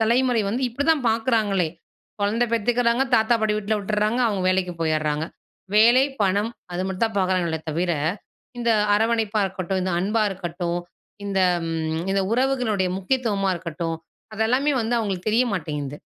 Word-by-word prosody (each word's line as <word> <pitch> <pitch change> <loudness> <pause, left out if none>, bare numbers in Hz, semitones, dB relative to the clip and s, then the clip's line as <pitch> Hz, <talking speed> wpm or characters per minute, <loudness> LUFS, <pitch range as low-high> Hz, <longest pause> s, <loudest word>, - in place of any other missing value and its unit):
தலைமுறை 240 +1 +2
வந்து 245 +6 -2
இப்டிதான் 285 +2 +1
பார்க்குறாங்களே. 220 -5 +1 0.5
கொழந்த 215 +4 +1
பெத்துக்குறாங்க, 235 +2 +2
தாத்தா 220 +1 +4
பாட்டி 215 -1 +1
வீட்ல 215 +1 -1
விட்றாங்க, 210 +3 0
அவங்க 205 -4 -1
வேலைக்கு 185 -1 +1
போயிட்றாங்க. 155 -1 0 0.5
வேலை, 235 +5 +6 0.2
பணம் 205 +3 +1 0.2
அது 175 +1 -2
மட்டும் 190 +3 -1
தான் 220 -2 -7
பார்க்குறாங்களே 185 -4 0
தவிர, 170 +3 0 0.7
இந்த 235 -1 +1 0.2
அரவணைப்பா 220 0 +1
இருக்கட்டும், 190 0 -3
இந்த 185 0 -1
அன்பா 210 +4 +1
இருக்கட்டும், 175 -2 -3 0.5
இந்த 195 -1 0 0.3
ம் 160 0 -2
இந்த 195 0 +2
உறவுகளுடைய 245 -6 +1
முக்கியத்துவமா 200 -2 0
இருக்கட்டும் 165 -1 -4 0.4
அது 215 +1 -1
எல்லாமே 270 +5 +2
வந்து 230 +1 -1
அவுங்களுக்கு 200 -4 -2
தெரிய 225 +4 +3
மாட்டேங்குது. 150 -5 -4
205 Hz, 140 wpm, -23 LUFS, 180-230 Hz, 0.7 s, வேலை